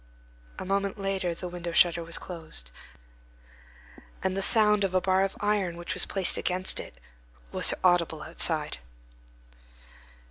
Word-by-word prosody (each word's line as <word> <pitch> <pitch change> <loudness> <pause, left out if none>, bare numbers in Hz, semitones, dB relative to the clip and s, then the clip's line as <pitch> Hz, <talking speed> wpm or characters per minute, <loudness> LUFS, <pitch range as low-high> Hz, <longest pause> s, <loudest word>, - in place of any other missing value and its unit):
A - - -6
moment 200 +1 -1
later, 195 -3 -1
the 180 - -6
window 175 -1 -6
shutter 170 -1 +4
was 165 0 -3
closed, 160 - -7 1.5
and 190 0 0
the 195 - -1
sound 210 -1 +4
of 190 -1 -1
a - - +5
bar 190 +1 +2
of 195 - -3
iron 205 -5 0
which 175 - -4
was 180 - -3
placed 190 -2 +2
against 185 +1 0
it - - -10 0.5
was - - +3
audible 170 -4 +2
outside. 160 - +2
180 Hz, 140 wpm, -27 LUFS, 170-195 Hz, 1.5 s, a